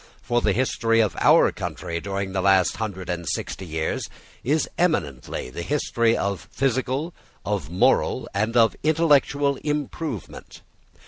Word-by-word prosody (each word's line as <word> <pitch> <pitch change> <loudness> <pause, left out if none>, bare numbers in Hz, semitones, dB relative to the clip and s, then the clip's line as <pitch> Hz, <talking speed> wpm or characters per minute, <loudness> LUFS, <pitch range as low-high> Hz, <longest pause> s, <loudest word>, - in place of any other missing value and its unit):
For 120 0 +1
the 105 - +2
history 115 0 +1
of 105 -7 +2
our - - +5
country 85 0 -5
during 100 +1 -3
the 95 0 -1
last 95 -1 +3
hundred 100 -4 -4
and 85 -1 -3
sixty 95 - -4
years 80 0 -2 0.3
is 150 +5 +1
eminently 75 - -1
the 85 - -6
history 115 - +1
of 100 -2 -3
physical, 135 +5 -1 0.3
of - - -2
moral, 90 +2 +2
and 110 +4 0
of 115 -1 +5
intellectual 145 -3 +3
improvement. 150 - -5
115 Hz, 135 wpm, -24 LUFS, 95-140 Hz, 0.3 s, our